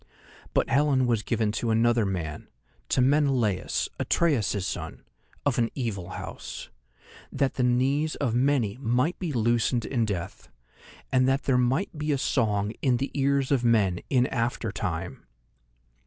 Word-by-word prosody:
But - - +3
Helen 135 -2 +3
was 115 -3 +1
given 110 -1 0
to 115 +1 -2
another 115 -1 +3
man, 80 -5 -4 0.4
to - - +2
Menelaus, 130 -8 +1
Atreus's 110 - +1
son, - - -5 0.4
of 140 -4 +1
an 115 -1 +2
evil 100 -9 -3
house, - - -7 0.6
that 135 -1 0
the - - -2
knees 135 +5 +1
of 130 -6 -1
many 125 -4 +1
might 125 +6 0
be 175 -4 -2
loosened 120 -1 +1
in 120 -4 0
death, 95 -5 -5 0.6
and 130 -1 +3
that 135 +1 +1
there 135 - +2
might 130 +10 0
be 150 0 -2
a 140 - +2
song 105 -6 0
in 130 -4 +2
the 135 +3 -3
ears 140 -1 +1
of 135 -3 +2
men 105 -7 +3
in 125 -2 +3
after 115 -2 -2
time. 90 -5 -4
120 Hz, 150 wpm, -26 LUFS, 110-135 Hz, 0.6 s, But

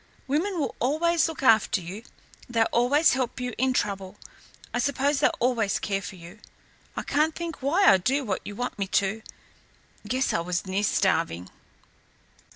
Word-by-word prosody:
Women 335 +7 -1
will 285 - -1
always 320 +7 +2
look 315 -3 -7
after 220 -5 +4
you; 185 +5 -8 0.5
they'll 230 -2 +2
always 275 +7 +4
help 255 -1 -2
you 250 -1 -3
in 260 +1 +2
trouble 195 -5 -2 0.6
I 245 - 0
suppose 280 +2 +1
they'll - - +4
always 230 -5 +1
care 195 -1 -2
for 195 - -8
you. 175 +4 -13 0.7
Can't 305 +3 +1
think 335 -3 -6
why 335 +9 +2
I 195 - +7
do 265 +9 0
what 195 -4 -2
you 205 - -7
want 245 -1 -4
me 195 - -1
to. 200 +3 0 0.9
Guess 255 +4 0
I - - +1
was 175 +2 -2
near 190 +1 -1
starving." 165 - 0
245 Hz, 160 wpm, -26 LUFS, 195-280 Hz, 0.9 s, I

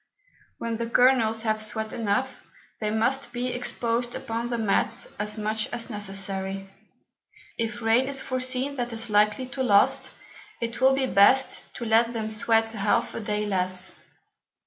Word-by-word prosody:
When 230 -1 -3
the 235 0 -3
Kernels 230 -2 +3
have 215 -1 0
sweat 220 0 -3
enough, 230 +4 -1 0.4
they 215 - -1
must 240 +4 0
be 250 +1 -2
exposed 240 -1 -2
upon 235 -3 -3
the 240 - -1
Mats 215 -3 0
as 210 +1 -1
much 215 +1 -1
as 240 0 -4
necessary: 195 -1 -2 0.9
If 230 +1 -2
Rain 230 +4 +3
is 275 -1 -1
foreseen 255 +2 -1
that 245 -1 -2
is 225 0 -2
likely 210 +4 +3
to 265 +1 -4
last, 205 -6 +3 0.5
it 235 +2 -4
will 265 +1 +5
be 270 -1 +1
best 255 +4 +3
to 235 - -5
let 230 +1 +3
them 220 -1 -3
sweat 225 +1 +1
half 210 -2 0
a - - -4
Day 210 -1 -2
less. 185 -2 0
225 Hz, 155 wpm, -26 LUFS, 210-245 Hz, 0.9 s, will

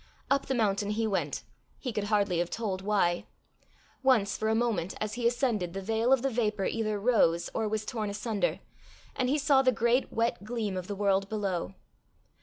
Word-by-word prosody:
Up 275 0 +2
the 265 - 0
mountain 205 -3 +1
he 220 +2 0
went 200 -3 -1 0.3
he 250 -4 -4
could 210 -1 -1
hardly 200 -4 +1
have 175 0 0
told 195 -4 -3
why. 190 -4 +1 0.7
Once, 245 -7 +3
for 220 - -1
a 220 - +2
moment, 220 -7 0
as 215 0 -2
he 235 0 +1
ascended, 235 -8 0
the 195 - -3
veil 225 +4 +1
of 265 -2 +4
the 270 - +2
vapour 210 -4 0
either 215 -2 -1
rose, 185 -7 +2
or 220 - 0
was 215 0 -2
torn 215 -4 -3
asunder, 205 -1 -1 0.5
and 255 -2 0
he 290 - +2
saw 285 -2 +4
the 260 -1 +4
great 235 +2 +1
wet 230 -3 0
gleam 215 -3 -3
of 185 -1 -4
the 205 - -4
world 195 -1 +1
below. 195 -3 -2
215 Hz, 195 wpm, -29 LUFS, 200-235 Hz, 0.7 s, of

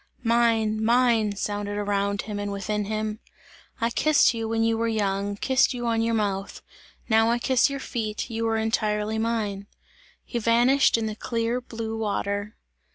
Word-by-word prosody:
"Mine, 225 -2 +2
mine!" 230 -3 +3
sounded 205 0 -3
around 200 -1 -1
him 210 -2 -5
and 205 0 -3
within 205 +1 -2
him. 215 0 -3 0.6
"I 230 +1 0
kissed 305 +3 +4
you, 225 -1 -3
when 225 0 +1
you 225 0 +2
were 230 +1 0
young, 200 -2 -1
kissed 260 +4 +2
you 240 -1 -4
on 230 -1 +1
your 230 0 +1
mouth! 200 -2 -2 0.4
Now 225 0 +4
I 235 - +2
kiss 255 +2 +2
your 275 0 -4
feet, 215 -5 -4
you 230 -1 -2
are 225 0 +1
entirely 215 -1 0
mine!" 215 -3 -2 0.6
He 240 - -3
vanished 240 +4 +4
in 225 - -2
the 215 -1 -3
clear 230 +2 -2
blue 225 -2 -5
water. 205 -1 -2
220 Hz, 165 wpm, -25 LUFS, 205-230 Hz, 0.6 s, kissed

